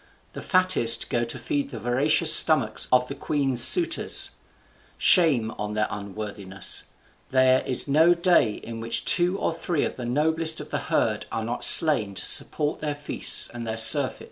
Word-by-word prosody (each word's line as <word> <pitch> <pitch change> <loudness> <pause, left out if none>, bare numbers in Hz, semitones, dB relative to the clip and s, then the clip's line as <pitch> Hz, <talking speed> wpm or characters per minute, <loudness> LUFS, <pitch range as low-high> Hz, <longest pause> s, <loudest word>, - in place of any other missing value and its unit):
The - - -10
fattest 185 - +1
go 120 - -2
to 115 - -8
feed 285 -3 -5
the - - -10
voracious 145 +6 0
stomachs 130 -9 +2
of 125 0 +1
the 140 - -8
queen's 140 -3 -3
suitors. 345 -2 0 0.7
Shame 140 - +1
on 105 0 -6
their 110 - -1
unworthiness! 100 -1 -6 0.4
there 130 0 +1
is 130 - +2
no 160 +5 +2
day 170 - 0
in 115 +2 -11
which 115 +1 -1
two 180 +2 +1
or - - -4
three 165 -1 -4
of - - -6
the 125 - -8
noblest 160 +5 -1
of - - -12
the - - -4
herd - - -3
are 110 - -5
not 120 +2 -5
slain 125 -11 +7
to - - -3
support 150 0 0
their 150 -1 -5
feasts 145 0 +2
and 120 -1 -10
their 110 0 -5
surfeits." 130 +4 +3
130 Hz, 170 wpm, -22 LUFS, 115-160 Hz, 0.7 s, slain